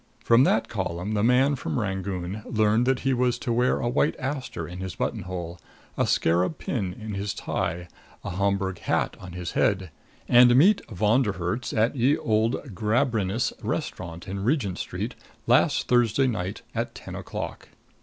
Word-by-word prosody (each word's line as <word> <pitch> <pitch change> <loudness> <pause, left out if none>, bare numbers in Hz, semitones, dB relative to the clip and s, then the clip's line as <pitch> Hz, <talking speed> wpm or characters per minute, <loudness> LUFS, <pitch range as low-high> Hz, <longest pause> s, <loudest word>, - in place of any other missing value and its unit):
From 120 +3 +5
that 115 - +2
column 95 -1 -3
the 105 - +1
man 130 +5 +4
from 130 - -3
Rangoon 95 -1 -3
learned 110 +1 +2
that 130 -1 +2
he 135 0 +1
was 125 0 +1
to 120 - -2
wear 125 +2 +2
a - - -1
white 135 +5 +2
aster 130 - -4
in 90 +1 -8
his 95 -4 -5
button - - -2
hole, 90 -1 -6 0.4
a - - +1
scarab 90 - +2
pin 100 -8 -2
in 105 +3 -7
his 100 0 -3
tie, 85 +1 -3 0.4
a - - -4
Homburg 100 0 0
hat - - 0
on 90 -2 -9
his 90 -1 -5
head, 95 -4 +1 0.4
and 120 0 +7
meet 190 +10 +5
Von 110 +5 +2
der 105 -6 0
Herts 90 +6 -3
at 115 +5 +1
Ye 135 +4 +3
Old 110 +2 +1 0.2
Gambrinus 110 +1 0
Restaurant 85 -1 -4
in 95 +1 -4
Regent 115 - 0
Street, - - -4 0.3
last - - +3
Thursday 120 +1 +3
night 105 -6 -2
at - - -3
ten - - -9
o'clock. - - -6
105 Hz, 170 wpm, -26 LUFS, 95-125 Hz, 0.4 s, and